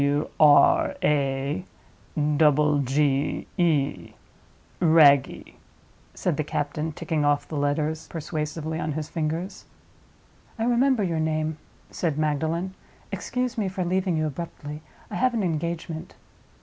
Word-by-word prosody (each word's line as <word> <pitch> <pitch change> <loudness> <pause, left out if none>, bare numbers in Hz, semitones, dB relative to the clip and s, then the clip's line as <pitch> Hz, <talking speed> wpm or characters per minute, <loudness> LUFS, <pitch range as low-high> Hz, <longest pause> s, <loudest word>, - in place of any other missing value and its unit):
"W, 145 +1 +1
R, 150 -2 +6
A, 140 +3 0 0.7
double 150 -1 +4
G, 140 +1 0
E—Wragge," 155 -1 +1 0.6
said 175 -6 -1
the 155 - 0
captain, 150 +2 -2
ticking 155 0 -2
off 145 0 +1
the 155 - -6
letters 150 +2 -1
persuasively 160 0 -4
on 155 -3 -2
his 155 0 -4
fingers. 165 +3 -3 0.9
"I 225 - -2
remember 245 0 +3
your 170 -4 -1
name," 155 0 -1 0.3
said 160 -5 -2
Magdalen. 160 +4 -1 0.4
"Excuse 250 -1 -2
me 205 - 0
for 185 -1 -3
leaving 185 -1 0
you 155 - 0
abruptly. 150 -1 -6 0.3
I - - -3
have 255 -1 +2
an 220 - 0
engagement." 165 -1 -3
155 Hz, 120 wpm, -25 LUFS, 145-170 Hz, 0.9 s, R